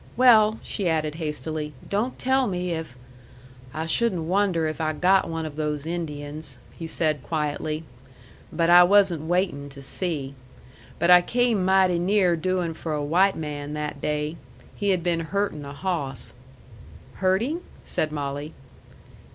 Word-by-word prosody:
"Well," 220 -3 +6
she 195 -5 -1
added 155 -2 0
hastily, 150 0 -3
"don't 215 +6 -1
tell 260 0 +2
me 180 -2 -2
if 160 -6 -4 0.4
" 125 +1 -21 0.3
"I 155 +3 -3
shouldn't 180 0 +1
wonder 180 -1 +1
if 155 +1 -3
I 155 0 0
got 185 +4 +3
one 165 -1 -3
of 150 -2 -6
those 150 -1 -2
Indians," 155 -2 -5
he 165 - -7
said 155 -3 0
quietly. 150 +2 -2 0.7
"But 165 +1 +2
I 175 0 +9
wasn't 180 -4 +3
waitin' 175 -5 0
to 140 0 -11
see! 145 -3 -3 0.6
But 170 - +3
I 180 0 +9
came 235 0 +1
mighty 185 -2 +3
near 185 -1 +3
doing 180 0 -1
for 160 0 -5
a 145 -1 -2
white 185 +6 +3
man 150 -1 -5
that 150 -2 -4
day. 150 +2 -2 0.4
He 205 - -2
had 185 -3 +1
been 170 -1 +1
hurtin' 165 -3 -2
a 140 - -7
hawss." 140 -6 -3 0.8
"Hurting?" 220 - +1 0.2
said 155 - -1
Molly. 145 +1 -4
165 Hz, 150 wpm, -25 LUFS, 150-185 Hz, 0.8 s, I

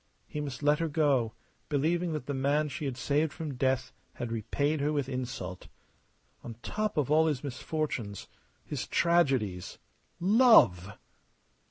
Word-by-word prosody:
He 150 - -5
must 140 -1 -6
let 150 +1 +3
her 165 - 0
go, 140 -7 +1 0.4
believing 165 +4 +1
that 150 -5 -4
the 145 - -3
man 145 +3 +1
she 145 - -5
had 130 -3 -3
saved 145 +4 +1
from 155 -2 -5
death 130 0 0 0.2
had 120 -1 -5
repaid 140 +7 -1
her 145 +1 +1
with 145 -4 -1
insult. 125 -9 -5 0.8
On 115 - -7
top 215 -4 -2
of 150 -2 +1
all 160 +1 +5
his 145 -3 -1
misfortunes, 130 - -4 0.4
his - - -4
tragedies 135 - +1 0.4
love! 180 - +5
145 Hz, 145 wpm, -30 LUFS, 125-155 Hz, 0.8 s, all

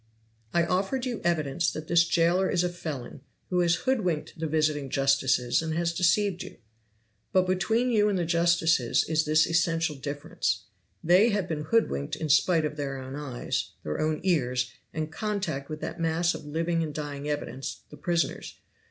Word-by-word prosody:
"I 170 -1 +2
offered 195 +9 0
you 245 -3 -3
evidence 160 -2 +1
that 155 0 -6
this 170 0 +4
jailer 175 +3 +2
is 180 - +2
a 180 - +1
felon, 155 -8 -6 0.3
who 180 - +2
has 175 -1 +3
hoodwinked 185 -14 -1
the 160 - -1
visiting 150 -2 0
justices 135 -2 +2
and 160 -1 -3
has 170 0 0
deceived 180 +2 +2
you. - - -9 0.7
But 185 -1 +3
between 220 +7 +1
you 210 -2 +3
and 200 - 0
the 175 - 0
justices 170 -6 +2
is 160 0 +1
this 155 +1 +4
essential 165 -2 +1
difference: 145 +2 -3 0.4
they 185 +7 +5
have 205 -5 0
been 150 -2 -3
hoodwinked 155 -7 +1
in 155 0 -4
spite 160 +3 +4
of 150 0 -4
their 140 -2 -3
own 130 +1 -7
eyes, 145 -4 -3
their 75 - -3
own 155 0 0
ears, 130 -8 +1 0.2
and 155 0 -4
contact 180 -8 -3
with 155 0 -6
that 175 - -5
mass 165 +1 +1
of - - -8
living 165 +2 0
and 155 -2 -3
dying 145 -1 -4
evidence, 135 -3 -4
the - - -11
prisoners. 170 -2 -1
160 Hz, 175 wpm, -27 LUFS, 145-175 Hz, 0.7 s, they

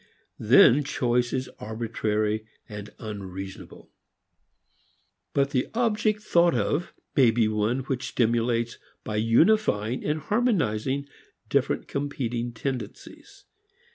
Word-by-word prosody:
Then 145 +5 +6
choice 120 -3 0
is 130 0 -2
arbitrary, 110 -1 -2 0.2
unreasonable. 100 -2 -8 1.4
But 140 0 +1
the 130 -3 0
object 215 -2 +1
thought 170 -6 +3
of 145 - -1 0.2
may 130 -5 +6
be 115 -1 +2
one 110 +4 0
which 130 -1 -3
stimulates 115 0 0 0.2
by 105 - -3
unifying, 115 - +2
harmonizing, 150 - 0 0.4
different - - 0
competing 120 -4 -3
tendencies. 120 -2 -7
120 Hz, 90 wpm, -26 LUFS, 110-140 Hz, 1.4 s, Then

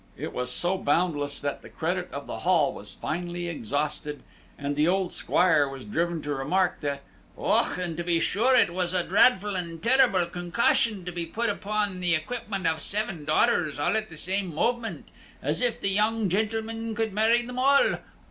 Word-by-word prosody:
It - - -5
was 125 0 -3
so 180 +7 0
boundless 145 -3 0
that 145 -1 -3
the - - -12
credit - - -2
of - - -6
the - - -6
Hall - - +2
was - - -7
finally 175 +1 -4
exhausted, 150 0 -3 0.3
and 145 0 -3
the 150 +2 +2
old 185 0 +1
Squire 160 -6 +3
was 135 -1 -8
driven 170 -5 -1
to 145 - -2
remark 170 +7 0
that 140 -1 -3 0.3
"Och, - - +1
and 175 -3 -3
to 175 - -2
be 170 -1 +1
sure 240 +9 +2
it 175 - +4
was 180 0 -1
a 180 - +2
dreadful 205 +1 +3
and 170 -2 -4
tirrabell 235 -6 +4
concussion, 180 +3 +1
to 180 - -4
be 170 -1 -4
put 230 +5 0
upon 205 -2 -2
the 175 -1 +2
equipment 195 +3 -4
of 160 -1 +1
seven 195 -7 -2
daughters 155 -1 +2
all 145 +8 +1
at 220 0 -1
the 160 - -11
same 190 +2 -2
moment, 235 +6 -1 0.3
as - - -2
if 245 -2 +1
the 195 - +1
young 215 +1 +2
gentleman 225 +3 -2
could 220 -2 -1
marry 225 +3 +3
them 250 +1 -5
all! 280 +2 +4
180 Hz, 185 wpm, -26 LUFS, 160-215 Hz, 0.3 s, it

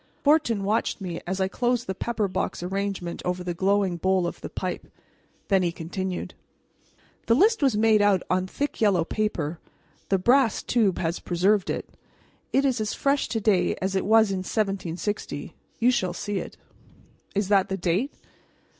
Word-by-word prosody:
Fortin 285 -9 +3
watched 215 +3 0
me 180 -4 -5
as 190 +1 -2
I 190 - +2
closed 245 +3 0
the 190 - -2
pepper 220 +1 -1
box 185 - -3
arrangement 195 -2 -3
over 180 0 -2
the 180 -1 -2
glowing 190 0 +1
bowl 185 +1 +1
of - - -5
the - - -6
pipe. - - -4 0.6
Then 195 -2 +3
he 175 -1 +1
continued: 180 +3 -4 0.9
"The 230 - +5
list 430 - +4
was 265 -7 +3
made 215 -1 +4
out 200 -3 +3
on 185 0 0
thick 285 +7 -4
yellow 190 -6 +3
paper; 170 -7 -2 0.5
the 195 - +3
brass 240 +4 +3
tube 215 -6 +2
has 170 -1 -1
preserved 190 +3 +1
it. - - -3 0.6
It 275 +1 +3
is 255 -4 +1
as 215 - -2
fresh 280 0 +1
to 225 - -1
day 205 -3 +2
as 190 +1 -2
it 190 - 0
was 220 0 +5
in 190 - -1
1760. 195 0 -3 0.2
You 240 +2 +4
shall 185 -7 0
see 205 +2 -3
it." - - -8 0.8
"Is 200 -1 0
that 195 -2 +3
the 190 - -2
date?" 190 - 0
195 Hz, 170 wpm, -25 LUFS, 185-225 Hz, 0.9 s, The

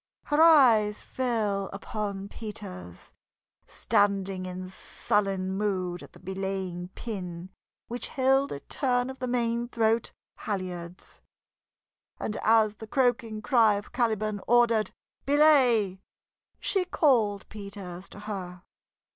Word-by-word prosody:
Her 295 +1 +2
eyes 240 -10 +6
fell 215 -6 -1
upon 200 -1 -4
Peters, 200 - -9 0.5
standing 195 -2 0
in 185 0 -6
sullen 190 0 -1
mood 190 -3 -2
at - - -13
the - - -15
belaying 190 -2 -4
pin 185 -5 -6 0.4
which 240 +1 -4
held 270 +1 +2
a 140 - -5
turn 250 -2 0
of 265 - -12
the 255 - -3
main 240 -1 0
throat 225 -1 +1 0.3
halyards. 180 -3 -6 1.0
And 215 - -3
as 220 -1 +3
the 220 - -9
croaking 235 -3 0
cry 225 -6 +4
of 205 +1 -6
Caliban 215 -4 0
ordered 235 -2 +4 0.4
"Belay!" 255 -10 +4 0.6
she 385 -2 +1
called 235 - +2
Peters 200 -3 -8
to 205 - -10
her. 185 -4 -6
210 Hz, 115 wpm, -28 LUFS, 190-240 Hz, 1.0 s, eyes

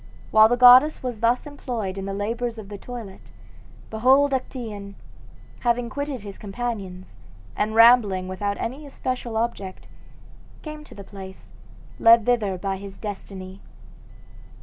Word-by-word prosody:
While 215 0 +7
the 245 - +1
goddess 255 +5 +7
was 245 -4 -4
thus 235 +2 +1
employed 245 -9 -5
in 195 -1 -5
the 195 - -4
labors 230 +3 -3
of 210 -3 -9
the 205 - -7
toilet, 230 -6 -9 0.6
behold 265 +6 +4
Actaeon, 220 -6 -5 0.6
having 240 -1 0
quitted 285 -2 -4
his 200 -1 -10
companions, 195 - -6 0.4
and 215 +1 -1
rambling 225 -5 +5
without 200 +2 -3
any 275 +6 -5
especial 255 -4 -4
object, 200 -5 -4 0.8
came 305 -1 -8
to - - -14
the 200 - -9
place, 190 -1 -11 0.5
led 230 -1 +6
thither 215 -6 +1
by 195 +1 -3
his 195 0 -10
destiny. 195 -2 -8
220 Hz, 135 wpm, -24 LUFS, 195-245 Hz, 0.8 s, While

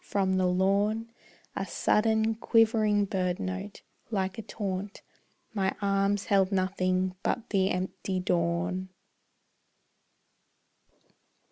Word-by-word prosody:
From 190 -2 0
the 185 -1 +2
lawn 200 +5 +1 0.4
A - - -1
sudden, 220 +1 +2
quivering 220 -2 +3
birdnote, 190 +1 -3 0.3
like 195 -1 -2
a - - -3
taunt. 200 -2 -5 0.5
My 195 -2 0
arms 200 0 +1
held 195 -1 +3
nothing 185 -1 0
but 235 - -2
the 190 -2 +2
empty 185 +1 -2
dawn. 175 +1 0
195 Hz, 95 wpm, -28 LUFS, 185-210 Hz, 0.5 s, quivering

